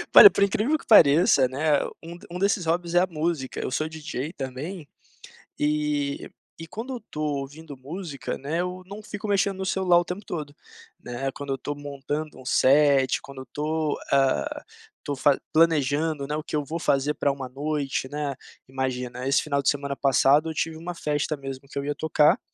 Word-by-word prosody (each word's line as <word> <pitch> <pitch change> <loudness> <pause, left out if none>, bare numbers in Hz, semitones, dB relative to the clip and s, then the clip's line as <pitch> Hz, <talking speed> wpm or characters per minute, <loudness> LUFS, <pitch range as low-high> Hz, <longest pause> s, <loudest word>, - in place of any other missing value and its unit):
Olha, 415 - +13
por 200 - +2
incrível 215 +10 +2
que - - -16
pareça, 145 - +6
né, 145 +3 +1 0.2
um 170 +1 -8
d - - -15
um 180 - -5
desses 200 -3 +1
hobbies, 170 +1 -1
é - - +7
a 185 - +2
música. 155 -5 -2
Eu - - -3
sou 155 +4 0
DJ, 155 -1 -5
também. 145 +4 -6 0.7
E 150 -1 -1 0.3
e 165 - -8
quando 235 +9 -6
eu 240 - -7
tô 155 - -5
ouvindo 145 +1 -4
música, 145 +2 -6
né, 155 +5 -2
eu 180 +1 -4
não 205 +3 -9
fico 210 0 -6
mexendo 200 -1 +1
no 190 - -3
celular 185 -2 +3
o 175 - -2
tempo 185 +4 -6
todo, 150 -4 -5 0.5
né. 125 +3 -3
Quando 140 -1 -6
eu - - -3
tô 145 +3 -5
montando 145 +2 -5
um 130 - -13
set, 135 0 +4
quando 140 -1 -10
eu - - -10
tô, 155 0 -1
ah, 215 - +1 0.4
tô 145 -2 -3
fa 140 +1 +4
planejando, 155 -2 +2
né, 150 - -4
o 155 - -4
que - - -5
eu 150 - 0
vou 160 +4 -4
fazer 140 -2 +1
pra 145 - 0
uma 135 -2 -6
noite, 140 0 -2
né. 145 -1 -3 0.3
Imagina, 125 -1 -3
esse 135 - +3
final 140 -2 0
de 135 - -4
semana 140 -1 -2
passado, 140 +3 +4
eu - - -4
tive 160 +1 -2
uma 175 +2 -6
festa 150 -1 -1
mesmo 135 -1 -8
que 140 - -9
eu 140 - -1
ia 145 +1 -1
tocar, 150 0 +3
150 Hz, 195 wpm, -25 LUFS, 140-170 Hz, 0.7 s, Olha